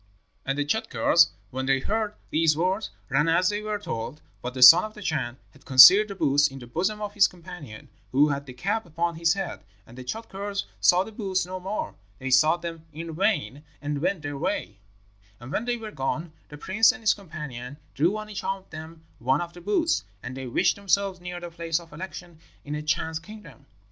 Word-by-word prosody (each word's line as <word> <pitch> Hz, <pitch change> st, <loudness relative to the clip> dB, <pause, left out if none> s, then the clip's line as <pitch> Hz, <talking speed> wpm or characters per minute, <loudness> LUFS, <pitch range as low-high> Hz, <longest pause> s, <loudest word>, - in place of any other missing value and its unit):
"And 135 Hz, +1 st, 0 dB
the 145 Hz, -, 0 dB
Tschadkurrs, 170 Hz, -3 st, +3 dB, 0.2 s
when 130 Hz, +1 st, -3 dB
they 135 Hz, 0 st, +4 dB
heard 210 Hz, +6 st, -2 dB, 0.2 s
these 155 Hz, -1 st, +3 dB
words, 190 Hz, +5 st, 0 dB, 0.2 s
ran 145 Hz, +4 st, +2 dB
as 170 Hz, +3 st, +3 dB
they 205 Hz, 0 st, -2 dB
were 215 Hz, 0 st, -2 dB
told; 150 Hz, -, -5 dB, 0.2 s
but 125 Hz, +1 st, -5 dB
the 130 Hz, -, +4 dB
son 165 Hz, +8 st, +11 dB
of 215 Hz, 0 st, -7 dB
the 210 Hz, -, -10 dB
Chan 130 Hz, -8 st, -2 dB
had 140 Hz, -, -21 dB
concealed 140 Hz, +11 st, +9 dB
the 200 Hz, -, -7 dB
boots 145 Hz, -3 st, +3 dB
in 135 Hz, -, -10 dB
the 125 Hz, -, -9 dB
bosom 185 Hz, -, -2 dB
of 205 Hz, -1 st, -5 dB
his 205 Hz, -1 st, +5 dB
companion, 170 Hz, -11 st, -11 dB, 0.2 s
who 145 Hz, +3 st, +4 dB
had 140 Hz, 0 st, -3 dB
the 130 Hz, -, -8 dB
cap 200 Hz, -, -2 dB
upon 170 Hz, +1 st, -1 dB
his 165 Hz, +2 st, +2 dB
head. 190 Hz, -4 st, -5 dB, 0.2 s
And 120 Hz, -, -15 dB
the 130 Hz, -, -8 dB
Tschadkurrs 200 Hz, -, -4 dB, 0.2 s
saw 180 Hz, +1 st, +5 dB
the 220 Hz, -, -10 dB
boots 195 Hz, -4 st, -1 dB
no 185 Hz, +1 st, -6 dB
more; 195 Hz, +3 st, -4 dB, 0.2 s
they 130 Hz, +3 st, -5 dB
sought 155 Hz, +7 st, +4 dB
them 165 Hz, -1 st, -7 dB
in 165 Hz, +2 st, -7 dB
vain, 155 Hz, -, 0 dB, 0.2 s
and 145 Hz, -1 st, -3 dB
went 175 Hz, -1 st, -1 dB
their 145 Hz, -1 st, -5 dB
way. 100 Hz, -4 st, -3 dB, 0.6 s
"And 120 Hz, +3 st, -10 dB
when 220 Hz, -, -1 dB
they 245 Hz, 0 st, -1 dB
were 220 Hz, -2 st, -8 dB
gone, 155 Hz, +2 st, -3 dB, 0.2 s
the 150 Hz, -, -10 dB
prince 205 Hz, +10 st, +4 dB
and 250 Hz, -1 st, -11 dB
his 215 Hz, -, +5 dB
companion 150 Hz, -, -8 dB, 0.2 s
drew 175 Hz, +8 st, +1 dB
on 215 Hz, 0 st, -6 dB
each 205 Hz, -2 st, -6 dB
of 195 Hz, 0 st, -4 dB
them 160 Hz, +1 st, -10 dB, 0.2 s
one 130 Hz, +3 st, +2 dB
of 170 Hz, 0 st, -5 dB
the 175 Hz, -, -12 dB
boots, 210 Hz, -, +1 dB, 0.2 s
and 130 Hz, -, -6 dB
they 130 Hz, -1 st, -6 dB
wished 120 Hz, -, +2 dB
themselves 200 Hz, -1 st, 0 dB
near 180 Hz, 0 st, -6 dB
the 175 Hz, -1 st, -8 dB
place 165 Hz, -1 st, -2 dB
of 165 Hz, -3 st, -15 dB
election 175 Hz, 0 st, -9 dB, 0.3 s
in 145 Hz, -, -5 dB
a 150 Hz, -, -3 dB
Chan's 160 Hz, +1 st, -1 dB
kingdom. 210 Hz, -7 st, -13 dB
165 Hz, 215 wpm, -26 LUFS, 145-200 Hz, 0.6 s, son